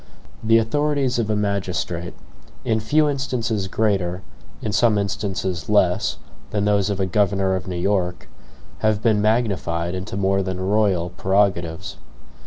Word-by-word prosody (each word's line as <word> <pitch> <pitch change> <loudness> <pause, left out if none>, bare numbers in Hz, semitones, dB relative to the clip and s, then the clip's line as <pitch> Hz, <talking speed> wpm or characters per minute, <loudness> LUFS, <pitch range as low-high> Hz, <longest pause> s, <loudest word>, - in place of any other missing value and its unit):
The 115 +1 +5
authorities 135 +2 +1
of 110 -2 -1
a 105 - +1
magistrate, 95 -4 -2 0.5
in 110 0 +1
few 150 +8 +2
instances 120 -7 -1
greater, 95 -3 0 0.4
in 105 - -3
some 105 0 +3
instances 95 -3 -2
less, 95 -4 +2 0.3
than 105 -1 -1
those 100 -1 +2
of 100 -1 -2
a 95 - +2
governor 100 0 +1
of 95 -2 -4
New 90 - -3
York, 90 -1 -1 0.5
have 110 -1 +1
been 110 -3 +3
magnified 100 -6 0
into 95 +1 -5
more 95 0 +2
than 95 -1 -3
royal 95 -3 +1
prerogatives. 95 -3 0
100 Hz, 140 wpm, -22 LUFS, 95-110 Hz, 0.5 s, The